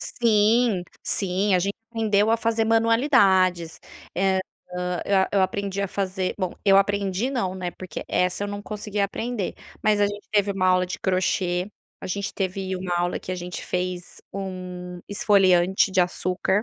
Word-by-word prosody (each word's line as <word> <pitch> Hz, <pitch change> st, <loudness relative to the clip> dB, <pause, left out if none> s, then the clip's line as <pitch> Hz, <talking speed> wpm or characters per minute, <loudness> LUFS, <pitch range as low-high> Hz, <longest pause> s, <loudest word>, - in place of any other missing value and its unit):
Sim, 220 Hz, -2 st, +2 dB, 0.2 s
sim. 195 Hz, +1 st, +1 dB
A -, -, +4 dB
gente 200 Hz, +3 st, -1 dB, 0.2 s
aprendeu 220 Hz, -2 st, +2 dB
a 230 Hz, -, +4 dB
fazer 225 Hz, 0 st, 0 dB
manualidades. 220 Hz, -, +3 dB, 0.3 s
Eh, 190 Hz, +1 st, +2 dB, 0.4 s
ah, 180 Hz, -1 st, -2 dB
eh, 195 Hz, -1 st, +2 dB
eu 195 Hz, -2 st, +3 dB
aprendi 200 Hz, +1 st, -2 dB
a 200 Hz, -, -1 dB
fazer, 190 Hz, -1 st, -2 dB
bom, 185 Hz, -2 st, -1 dB
eu 195 Hz, -1 st, +6 dB
aprendi, 200 Hz, +4 st, +1 dB
não, 190 Hz, -8 st, -1 dB
né, 180 Hz, -2 st, -4 dB
porque 185 Hz, +1 st, -8 dB
essa 180 Hz, +2 st, 0 dB
eu -, -, -4 dB
não 205 Hz, 0 st, -5 dB
consegui 210 Hz, -1 st, -4 dB
aprender 210 Hz, +1 st, -2 dB, 0.3 s
mas 210 Hz, -1 st, +3 dB
a 205 Hz, -, +5 dB
gente 205 Hz, 0 st, -7 dB
teve 205 Hz, -1 st, +2 dB
uma 185 Hz, -1 st, 0 dB
aula 185 Hz, 0 st, +4 dB
de 180 Hz, -, -5 dB
crochê, 185 Hz, 0 st, 0 dB, 0.3 s
a -, -, -4 dB
gente 200 Hz, +1 st, -3 dB
teve 190 Hz, -1 st, -2 dB
uma 180 Hz, -1 st, -3 dB
aula 175 Hz, 0 st, 0 dB
em -, -, -5 dB
que 185 Hz, -, -5 dB
a -, -, -1 dB
gente 180 Hz, 0 st, -6 dB
fez 180 Hz, -1 st, -4 dB
1 180 Hz, -2 st, -6 dB
esfoliante 190 Hz, -2 st, +3 dB
de 190 Hz, -1 st, +3 dB
açúcar, 185 Hz, +3 st, 0 dB
195 Hz, 175 wpm, -24 LUFS, 185-205 Hz, 0.4 s, eu